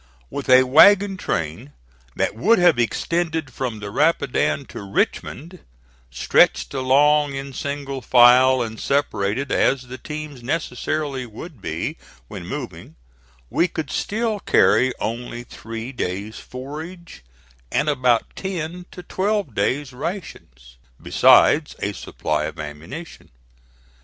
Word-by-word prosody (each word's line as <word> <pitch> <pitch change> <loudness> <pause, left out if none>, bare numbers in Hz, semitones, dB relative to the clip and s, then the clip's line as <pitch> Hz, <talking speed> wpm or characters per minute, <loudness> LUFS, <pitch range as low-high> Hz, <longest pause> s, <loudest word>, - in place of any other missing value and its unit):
With 140 -1 -5
a 130 0 +8
wagon 195 +9 +6
train 85 - -4 0.4
that - - 0
would 195 - +3
have 175 -7 +4
extended 160 +3 -1
from 120 -4 -4
the 100 -1 -6
Rapidan 140 - +1
to - - -8
Richmond, 150 - -2 0.5
stretched - - +2
along 140 +2 +3
in 135 0 -6
single 140 -1 -4
file 125 +1 +6
and 110 -1 -7
separated 130 -3 -1
as 135 -2 +2
the 125 +1 -9
teams 150 -4 -7
necessarily 145 -1 -3
would 120 - -11
be 80 -2 -4 0.3
when - - -8
moving, - - -7 0.6
we 170 - +2
could 160 -4 -5
still 220 0 -1
carry 130 -8 +3
only 120 +1 -4
three 115 +1 -8
days' 100 -3 -4
forage 155 - -9 0.5
and 145 - +1
about 125 -5 +1
ten 180 -1 -5
to 180 - -11
twelve 195 - -1
days' 130 +6 -1
rations, 65 - -7 0.2
besides 150 0 +4
a 100 - -3
supply 75 -4 -3
of 80 +1 -7
ammunition. 75 - -9
135 Hz, 120 wpm, -22 LUFS, 115-160 Hz, 0.6 s, a